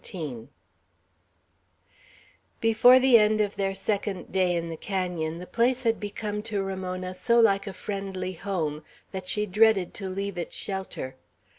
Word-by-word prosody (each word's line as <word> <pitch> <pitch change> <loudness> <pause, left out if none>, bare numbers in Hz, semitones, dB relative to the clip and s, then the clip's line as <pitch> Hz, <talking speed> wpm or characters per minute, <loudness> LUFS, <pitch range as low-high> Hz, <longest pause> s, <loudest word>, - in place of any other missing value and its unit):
XVII 140 - -5 2.1
BEFORE 225 +3 +6
the 260 -2 +6
end 215 0 +3
of 205 -1 0
their 195 -1 -1
second 195 -1 -2
day 185 -2 +2
in 170 -1 -2
the 165 - -4
canon, 175 -3 -3
the 180 - -7
place 245 +5 +1
had 225 -1 +1
become 210 0 -4
to 210 -2 -2
Ramona 185 -1 -4
so 235 +6 +2
like 200 -3 +3
a 195 - -4
friendly 190 -1 -4
home, 160 -5 -3 0.3
that 190 -1 -6
she 210 +3 +1
dreaded 210 -2 +3
to 195 -2 -3
leave 195 -1 -4
its 170 - -5
shelter. 190 -9 -5
195 Hz, 150 wpm, -27 LUFS, 180-210 Hz, 2.1 s, BEFORE